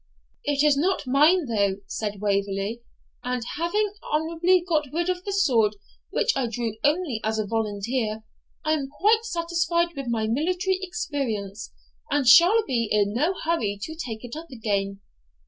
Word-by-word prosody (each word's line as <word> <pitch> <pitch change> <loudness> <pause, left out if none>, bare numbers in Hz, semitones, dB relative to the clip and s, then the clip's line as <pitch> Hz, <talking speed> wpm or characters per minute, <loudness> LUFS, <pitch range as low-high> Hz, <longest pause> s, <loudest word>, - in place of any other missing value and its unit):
'It 290 0 +2
is 300 -2 +5
not 360 +5 0
mine, 300 +7 +4
though,' 200 -5 +1
said 210 -2 -4
Waverley; 200 +2 -1 0.4
'and 250 -1 -2 0.2
having 405 +5 0 0.2
honourably 335 +3 +2
got 305 -4 +1
rid 345 +3 -1
of 360 0 -2
the 400 - -2
sword, 240 - +3 0.3
which 485 - +1
I 265 -3 0
drew 230 -1 -3
only 290 -6 +1
as 220 0 0
a 215 - 0
volunteer, 220 +1 -2 0.4
I 310 - +3
am 280 -3 -2
quite 430 +9 +2
satisfied 340 -2 0
with 275 -2 -5
my 225 -2 0
military 360 +10 0
experience, 245 - -4 0.4
and 285 -2 +1
shall 355 - +7
be 235 -4 0
in 205 -1 +2
no 315 - +1
hurry 230 -12 0
to 315 - -5
take 250 -9 -6
it 245 +1 -7
up 325 +2 -7
again.' 200 -4 -2
275 Hz, 160 wpm, -25 LUFS, 220-340 Hz, 0.4 s, shall